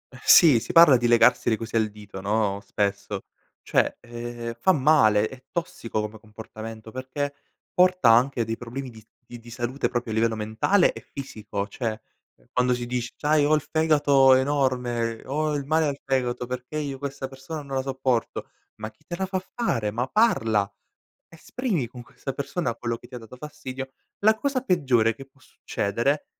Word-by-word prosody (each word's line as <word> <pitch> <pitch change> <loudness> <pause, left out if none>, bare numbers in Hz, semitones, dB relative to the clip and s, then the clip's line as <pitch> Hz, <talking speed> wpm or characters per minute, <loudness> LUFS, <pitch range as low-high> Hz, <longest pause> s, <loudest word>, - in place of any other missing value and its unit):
Eh - - -12
sì, 150 -9 +7
si - - -6
parla 165 -5 +8
di 120 -1 +1
legarsi 120 +1 +4
le 110 - +1
cose 115 +1 -7
al 110 -1 +1
dito, 105 -2 -10
no, 100 0 0
spesso. 100 -1 -2 0.4
Cioè, - - +1
ehm, 120 0 -7
fa 190 - +5
male, 130 - +4
è 130 +1 -13
tossico 120 -10 -3
come 105 +1 -6
comportamento 110 0 -10
perché 130 +3 -4 0.4
porta 180 -9 +5
anche 120 0 +3
dei 115 +1 -2
problemi 125 +3 -7
di 110 - -13
s 110 - -28 0.2
di 120 +1 -10
di 120 +1 -14
salute 120 +3 -2
proprio 120 -2 -3
a - - -2
livello 115 0 +2
mentale 110 - +2
e - - -8
fisico. 105 -7 -6
Cioè, 110 +1 -4 0.4
ehm, - - -29
quando 125 0 +2
si 120 0 -4
dice: 120 -1 -3
"C'hai 150 0 +2
ho 150 +2 +4
il 150 - 0
fegato 145 -4 +4
enorme, 125 -4 0
ho 150 +2 -1
il 140 -1 -3
male 155 +2 +2
al 140 - -2
fegato 125 -2 -1
perché 125 +4 -5
io 140 -3 -4
questa 140 -1 -5
persona 135 +4 -8
non 135 -1 -6
la - - +1
sopporto." 130 -3 -2 0.3
Ma 110 0 -7
chi 110 - -33
te 175 - -4
la 190 +2 -2
fa 190 0 -2 0.2
fare? 115 - 0
Ma 120 +4 -2
parla. 110 - +2 0.6
Esprimi 165 - -3
con 125 +1 -10
questa 135 +3 -7
persona 140 -2 -3
quello 120 0 -3
che 120 - -16
ti 125 - -13
ha - - -5
dato 115 +1 -13
fastidio, 135 -2 -7 0.3
la 220 +2 +5
cosa 275 +1 -1
peggiore 130 - +2
che 135 - -10
può 135 0 -30
succedere 125 +6 -2
125 Hz, 185 wpm, -25 LUFS, 115-145 Hz, 0.6 s, parla